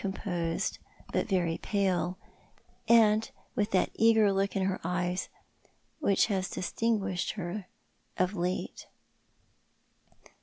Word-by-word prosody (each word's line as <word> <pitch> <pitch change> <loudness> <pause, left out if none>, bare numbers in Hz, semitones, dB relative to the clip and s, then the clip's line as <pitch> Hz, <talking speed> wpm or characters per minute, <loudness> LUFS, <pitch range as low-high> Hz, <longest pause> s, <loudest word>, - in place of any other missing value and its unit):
composed, 175 -4 -2 0.3
but - - +1
very 175 -4 +1
pale, 185 -3 0 0.7
and 220 -1 +5 0.2
with 205 0 0
tliat 190 -4 +2
eager 220 -3 +4
look 195 +1 0
in 195 - +1
her 190 0 0
eyes 180 +1 -1 0.7
■which 200 -9 +4
has 190 -4 -1
distinguished 195 -2 -1
her 190 0 -5 0.5
of 185 +2 +1
late. 180 -1 -3
190 Hz, 105 wpm, -30 LUFS, 180-210 Hz, 0.7 s, and